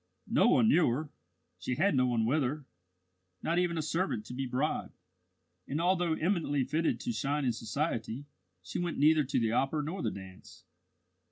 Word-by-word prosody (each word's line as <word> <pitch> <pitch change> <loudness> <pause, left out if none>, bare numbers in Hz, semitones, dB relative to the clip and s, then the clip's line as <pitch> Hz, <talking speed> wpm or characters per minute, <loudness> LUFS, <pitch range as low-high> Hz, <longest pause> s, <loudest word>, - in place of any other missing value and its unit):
No - - +3
one 225 - +5
knew 180 -7 +5
her; 145 +5 -2 0.5
she 125 - -2
had 190 +7 +2
no 130 -2 +3
one 115 -2 +1
with 145 +7 +2
her 140 +2 -2 0.8
not 170 +2 +1
even 175 -2 0
a 160 - -1
servant 150 - -1
to - - -8
be 135 +1 -3
bribed 130 +5 -2 0.7
and 145 - -2
although 175 -1 +2
eminently 160 -6 0
fitted 160 +5 0
to 245 - -2
shine 145 - -1
in 120 - +2
society, 115 +1 -3 0.4
she 95 - -4
went 175 -1 -2
neither 150 +2 +5
to 135 0 0
the 115 -2 +1
opera 135 +5 +1
nor 170 +5 -4
the - - 0
dance. 95 -1 -11
145 Hz, 180 wpm, -31 LUFS, 125-165 Hz, 0.8 s, one